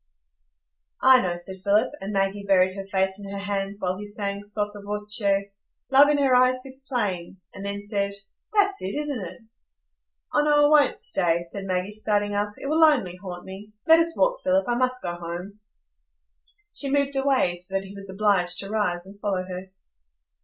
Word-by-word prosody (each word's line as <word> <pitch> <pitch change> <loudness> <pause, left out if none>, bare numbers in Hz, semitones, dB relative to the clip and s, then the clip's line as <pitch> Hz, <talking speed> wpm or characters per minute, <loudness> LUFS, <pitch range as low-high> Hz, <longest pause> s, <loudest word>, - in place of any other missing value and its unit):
"I 260 -1 +7
know," 175 -1 -2
said 185 +2 -10
Philip; 210 +5 +2
and 195 +2 -4
Maggie 195 0 0
buried 185 -1 +4
her 195 -1 -6
face 190 +1 0
in 200 - -7
her 200 - -4
hands 200 0 -3
while 185 0 -2
he 210 - -6
sang 200 -1 -3
sotto 205 0 -4
voce, 210 +1 -5 0.7
"Love 280 +2 +7
in 295 - +3
her 275 -2 +3
eyes 255 0 +4
sits 265 0 -10
playing," 200 -10 -3 0.2
and 195 - -8
then 200 0 -4
said, 200 -1 0 0.4
"That's 405 -2 +2
it, 190 - -4
isn't 295 -5 -2
it?" 180 +5 -9 0.9
"Oh 295 - +4
no, 295 0 +4
I 295 -2 +7
won't - - -7
stay," 170 -2 +1
said 195 +3 -6
Maggie, 185 +1 -1
starting 205 -1 0
up. 205 0 -1
"It - - -9
will 315 +3 +3
only 245 - +4
haunt 180 -2 -8
me. 200 +3 -10
Let 325 +1 +7
us 330 0 0
walk, - - +2
Philip. 280 +1 +2
I 240 - +1
must 255 +1 0
go 175 - -2
home." 175 +4 -7 1.1
She 280 - -1
moved 280 0 +1
away, 270 -10 +2
so 180 +2 -3
that 195 - 0
he 195 0 -11
was 195 -1 -10
obliged 190 -3 +1
to 195 +1 -7
rise 180 -5 0
and 200 +1 -11
follow 195 -3 -1
her. 185 +1 -7
205 Hz, 190 wpm, -25 LUFS, 190-255 Hz, 1.1 s, I